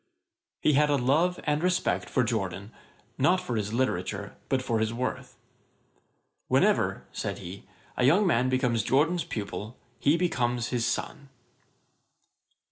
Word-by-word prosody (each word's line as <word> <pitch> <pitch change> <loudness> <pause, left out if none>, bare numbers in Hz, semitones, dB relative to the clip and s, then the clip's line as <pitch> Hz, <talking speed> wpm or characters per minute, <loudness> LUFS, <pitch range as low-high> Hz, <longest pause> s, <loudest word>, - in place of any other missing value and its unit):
] - - -63
He 150 - +4
had 150 +2 +4
a 145 - +3
love 150 +8 +2
and 150 0 0
respect 180 +1 0
for 130 - +2
Jorden, 100 -3 -3 0.5
not 175 +8 +4
for 130 -10 -4
his 105 -1 -2
literature, 100 -4 -2
but 130 -1 +1
for 115 -3 0
his 110 0 0
worth. 125 +2 -4 1.1
'Whenever - - +2
(said - - -4
he) 90 +3 -9 0.3
a - - 0
young 175 +11 +5
man 130 -7 +2
becomes 125 -4 +1
Jorden's 160 +7 +2
pupil, 110 0 -6 0.2
he 145 +4 +3
becomes 125 -8 0
his 120 -2 0
son.' 140 +3 -4
130 Hz, 140 wpm, -28 LUFS, 115-150 Hz, 1.1 s, young